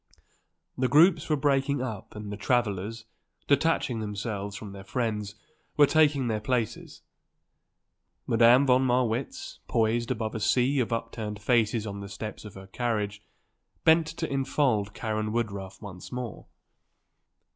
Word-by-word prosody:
The 130 - +3
groups 160 +3 +5
were 155 - +3
breaking 140 -1 +1
up 115 -6 -6
and 105 -1 -6
the - - -3
travellers, 110 -1 -1 0.4
detaching 140 -4 +2
themselves 105 -1 -4
from 105 -1 -8
their 100 -1 -9
friends, 105 -2 -2 0.4
were 145 - +8
taking 145 -3 +3
their 110 -2 0
places. 115 0 -3 1.2
Madame 120 +4 +5
von 130 -1 +4
Marwitz, 125 0 -1
poised 115 +1 +1
above 110 -3 -2
a 110 - -3
sea 130 +5 +2
of 120 - 0
upturned 115 -2 -4
faces 110 0 +1
on 100 -1 -5
the 100 0 -7
steps 105 +2 -7
of 105 - -10
her 95 0 -10
carriage, 105 -1 -2 0.6
bent 160 0 +5
to 165 0 -4
enfold 130 -6 0
Karen 110 -1 -2
Woodruff 100 -4 -3
once 95 -3 -9
more. 125 -4 -6
115 Hz, 135 wpm, -27 LUFS, 105-130 Hz, 1.2 s, were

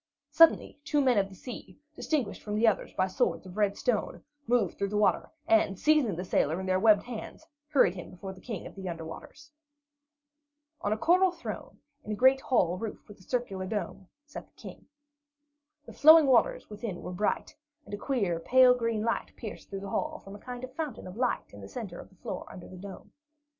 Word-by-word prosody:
Suddenly 330 -3 +5
two 295 0 +1
men 255 -6 +4
of 195 0 0
the 190 - -13
sea, 245 +5 -9 0.2
distinguished 270 -10 -2
from 210 -1 -4
the 220 +2 +3
others 215 - +1
by 185 - +1
swords 190 - -1
of 185 0 -10
red 205 -1 +1
stone, 240 -4 -1 0.2
moved 230 -6 +2
through 200 - -1
the 210 - -1
water, 210 - +2 0.2
and 330 - +3
seizing 300 - +3
the 180 +3 -5
sailor 160 -1 +1
in 190 - -4
their 185 0 +1
webbed 210 -1 +5
hands, 245 +5 -8 0.2
hurried 270 - +4
him 180 -2 -8
before 190 +2 -8
the 185 - -15
King 220 -5 -6
of - - -9
the 190 -2 -6
Under 165 -1 -6
Waters. 295 - -11 1.3
On 205 - -1
a 215 - +1
coral 365 - +4
throne, 350 -1 -7 0.3
in 215 - -6
a - - -1
great 260 +4 +5
hall 185 -10 +1
roofed 220 0 -6
with 205 - -14
a - - -18
high - - -20
circular 195 -7 -2
dome, 200 -2 -4 0.2
sat 300 - -9
the - - -37
King. - - -11 1.0
The - - -11
flowing 315 +1 +8
waters 250 -5 +3
within 210 -3 -6
were - - -5
bright, 205 +4 -1 0.3
and - - -11
a - - -2
queer, 200 -9 -1
pale 255 +7 +6
green 230 -3 -1
light 230 - -1
pierced 220 -4 -8
through 195 -1 -5
the 200 - -6
hall 310 0 -2
from 195 -6 -11
a - - -11
kind 250 +1 -8
of 255 0 -7
fountain 295 -5 -5
of 185 0 -9
light 250 +1 -1
in 100 - -11
the 100 - -10
centre 200 -8 -7
of - - -11
the 190 - -23
floor - - -6
under 180 - -10
the 185 - -11
dome. 190 0 -10
210 Hz, 215 wpm, -29 LUFS, 190-255 Hz, 1.3 s, flowing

